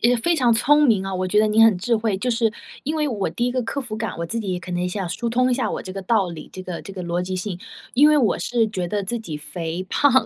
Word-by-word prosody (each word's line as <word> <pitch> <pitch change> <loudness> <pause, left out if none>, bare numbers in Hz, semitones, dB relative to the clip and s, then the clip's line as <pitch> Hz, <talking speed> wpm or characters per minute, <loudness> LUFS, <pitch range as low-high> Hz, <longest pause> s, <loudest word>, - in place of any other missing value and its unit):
也 245 +1 +4
非 340 +9 +1
常 250 -5 +4
聪 295 +6 +4
明 215 -8 +3
啊， 195 0 -3
我 185 0 -1
觉 210 +3 +3
得 215 - +3
你 215 +1 +4
很 225 -4 +6
智 230 +5 +1
慧， 215 -2 0
就 250 +5 -1
是 230 -2 +1 0.3
因 300 +3 -1
为 305 -2 0
我 210 -7 -1
第 240 +9 -1
一 - - 0
个 255 - 0
克 280 +5 -3
服 235 -5 -6
感， 220 -2 -4
我 170 - -2
自 230 - -3
己 190 -5 -2
可 180 - -9
能 175 +1 -1
想 190 -1 -3
疏 235 +7 -3
通 250 +2 +2
一 - - +3
下 255 - -1
我 - - -4
这 185 - -7
个 195 - -5
道 200 -1 +2
理， 160 -3 -8
这 185 - -7
个 180 -2 -5
这 195 - -9
个 190 -2 -6
逻 175 0 -1
辑 185 +1 -4
性。 185 -1 -4 0.4
因 285 +4 +7
为 305 - +5
我 245 -8 +2
是 235 -2 +1
觉 185 -4 -3
得 205 +3 -2
自 235 +5 -3
己 170 -9 -6
肥 165 +3 -5
胖， 285 +5 +3
215 Hz, 330 characters per minute, -22 LUFS, 185-240 Hz, 0.4 s, 因